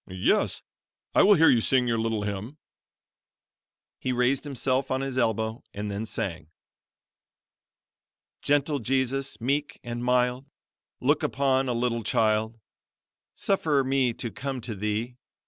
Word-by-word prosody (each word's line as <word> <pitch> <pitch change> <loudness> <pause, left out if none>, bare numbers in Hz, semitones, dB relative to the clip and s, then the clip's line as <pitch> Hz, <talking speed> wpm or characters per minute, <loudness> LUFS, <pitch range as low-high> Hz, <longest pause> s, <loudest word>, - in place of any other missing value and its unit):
"Yes, 95 0 +1 0.5
I - - +5
will 205 +1 +7
hear 160 -1 +6
you 120 - +3
sing 125 +1 +2
your 115 -1 +1
little 110 -2 -1
hymn." 105 +7 -5 1.4
He 130 - -2
raised 125 +3 +1
himself 135 -1 -1
on 130 0 0
his 135 -1 -3
elbow 110 -2 0
and 105 0 -4
then 105 +3 -4
sang: 80 -8 -4 1.9
"Gentle 145 0 +1
Jesus, 135 +2 -1
meek 140 +5 -1
and 120 0 -5
mild, 125 +2 +1 0.5
Look - - +2
upon 135 -1 +1
a - - +1
little 120 0 0
child; 110 +1 +1 0.8
Suffer 155 -8 +1
me 130 -2 +2
to 115 0 -5
come 135 +2 -4
to 115 0 -4
Thee. 105 +4 -3
125 Hz, 130 wpm, -26 LUFS, 110-135 Hz, 1.9 s, will